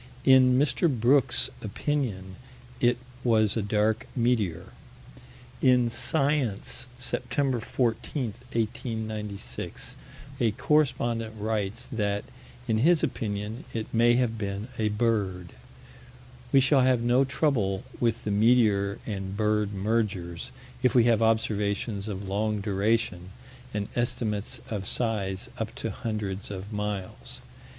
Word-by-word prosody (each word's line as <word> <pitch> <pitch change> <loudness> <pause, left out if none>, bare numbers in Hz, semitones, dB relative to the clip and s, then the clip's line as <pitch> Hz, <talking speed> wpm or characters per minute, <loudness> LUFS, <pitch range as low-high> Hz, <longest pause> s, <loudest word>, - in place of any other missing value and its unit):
In 130 -1 +7
Mr. 150 +4 +2
Brooks' 130 +1 +3
opinion 100 -11 -2 0.4
it 120 0 +3 0.3
was 110 -4 +3
a 115 - +1
dark 105 +3 +1
meteor. 115 -9 0 0.9
In 125 -2 +4
Science, 135 -7 -1
Sept. 130 0 -1
14, 125 +4 -1 0.3
1896, 110 -3 -4 0.4
a 115 -3 +3
correspondent 120 -6 +1
writes 110 +2 -2
that, 105 -3 -1 0.4
in 110 -1 +2
his 165 +6 +4
opinion, 105 +1 -3
it 110 -1 -4
may 120 +1 +5
have 120 -3 +1
been 100 +2 -4
a 110 -1 +2
bird. 105 -5 0 1.0
We 135 - +6
shall 135 +1 +4
have 130 -2 +3
no 120 +3 +4
trouble 130 -8 0 0.2
with 115 -1 +1
the 105 - -2
meteor 105 -2 +3
and 95 -2 -4
bird 105 -1 +1
mergers, 100 -4 -1 0.3
if 125 -1 +2
we 120 - +7
have 115 -2 +3
observations 105 -2 0
of 100 -2 -5
long 105 +2 0
duration 100 -2 0 0.4
and 100 -1 -2
estimates 110 -3 -1
of 100 -3 -4
size 100 -5 -1
up 110 0 -3
to 115 - -3
hundreds 100 -2 -4
of 100 +1 -6
miles. 105 -2 -4
110 Hz, 115 wpm, -27 LUFS, 100-120 Hz, 1.0 s, In